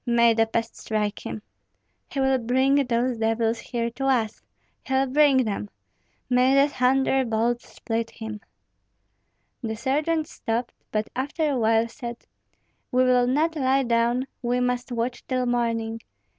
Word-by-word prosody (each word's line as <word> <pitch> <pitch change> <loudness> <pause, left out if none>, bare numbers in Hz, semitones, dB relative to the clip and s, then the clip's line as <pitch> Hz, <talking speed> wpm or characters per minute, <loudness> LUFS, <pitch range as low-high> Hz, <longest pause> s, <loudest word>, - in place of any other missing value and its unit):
May 235 -1 +5
the 225 0 +2
pest 230 0 -2
strike 210 -1 -2
him!" 215 - -6 0.7
"He 275 - -4
will 265 -1 +3
bring 260 +3 +2
those 240 0 0
devils 225 +1 +1
here 235 -1 -3
to 270 +3 -4
us, 230 -5 +1 0.5
he'll 265 0 +2
bring 270 -1 +4
them. 200 - -3 0.6
May 255 +2 +4
the 275 +1 +5
thunderbolts 250 -3 +1
split 230 -1 -2
him!" 220 -1 -7 1.2
The 220 -3 -3
sergeant 300 +6 0
stopped, 240 -6 -3 0.2
but 215 0 -1
after 290 +4 -1
a 265 - 0
while 225 0 +3
said, 235 0 -7 0.7
"We 255 0 +4
will 250 -1 +4
not 310 +6 +1
lie 270 -1 +2
down; 235 +1 +1 0.2
we 245 0 0
must 250 0 -1
watch 240 +1 -2
till 255 -1 0
morning. 230 -2 -1
245 Hz, 145 wpm, -25 LUFS, 230-265 Hz, 1.2 s, May